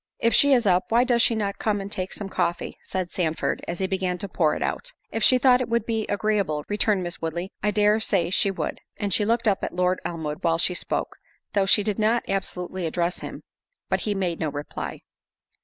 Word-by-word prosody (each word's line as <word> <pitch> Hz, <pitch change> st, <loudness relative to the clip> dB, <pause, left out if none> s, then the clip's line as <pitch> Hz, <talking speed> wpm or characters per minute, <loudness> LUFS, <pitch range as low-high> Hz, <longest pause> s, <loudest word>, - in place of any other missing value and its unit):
"If 230 Hz, -, +2 dB
she 285 Hz, -, +5 dB
is 245 Hz, -4 st, +4 dB
up, 185 Hz, -2 st, +3 dB
why 235 Hz, +2 st, +4 dB
does 240 Hz, -2 st, +4 dB
not 210 Hz, -4 st, -1 dB
she -, -, -37 dB
come 210 Hz, -2 st, 0 dB
and 195 Hz, 0 st, -6 dB
take 185 Hz, -1 st, -3 dB
some 200 Hz, -, -5 dB
coffee?" 175 Hz, -2 st, -2 dB
said 185 Hz, -2 st, -4 dB
Sandford, 160 Hz, -3 st, -1 dB
as 170 Hz, -, -3 dB
he 190 Hz, -, 0 dB
began 185 Hz, -1 st, -1 dB
to 200 Hz, -, -5 dB
pour 165 Hz, -4 st, +1 dB
it -, -, -2 dB
out. -, -, -3 dB, 0.2 s
"If 225 Hz, -, -2 dB
she 255 Hz, -, +6 dB
thought 250 Hz, 0 st, +5 dB
it 245 Hz, -, -3 dB
would 230 Hz, -1 st, +1 dB
be 225 Hz, -2 st, -1 dB
agreeable," 200 Hz, -7 st, 0 dB
returned 205 Hz, -2 st, +1 dB
Miss 175 Hz, 0 st, -5 dB
Woodley, 170 Hz, +3 st, -3 dB
"I 210 Hz, -, +1 dB
dare 210 Hz, +1 st, +3 dB
say 185 Hz, -6 st, +1 dB
she 200 Hz, -, +4 dB
would." 195 Hz, -, -3 dB, 0.2 s
And 205 Hz, -3 st, -2 dB
she 210 Hz, -, +3 dB
looked 230 Hz, +2 st, +1 dB
at 195 Hz, -3 st, 0 dB
Lord 180 Hz, +1 st, +1 dB
Elmwood 160 Hz, -3 st, -4 dB
while 165 Hz, -1 st, +2 dB
she 175 Hz, +2 st, +3 dB
spoke, -, -, -3 dB, 0.4 s
though 195 Hz, -2 st, +2 dB
she 205 Hz, +1 st, +5 dB
did 210 Hz, 0 st, -1 dB
not 225 Hz, +2 st, +2 dB
absolutely 185 Hz, -2 st, -2 dB
address 170 Hz, +2 st, -1 dB
him; -, -, -8 dB, 0.5 s
but -, -, +1 dB
he 210 Hz, -1 st, -2 dB
made 180 Hz, -4 st, -1 dB
no 155 Hz, -, -1 dB
reply. 145 Hz, 0 st, -6 dB
195 Hz, 225 wpm, -25 LUFS, 175-215 Hz, 0.5 s, she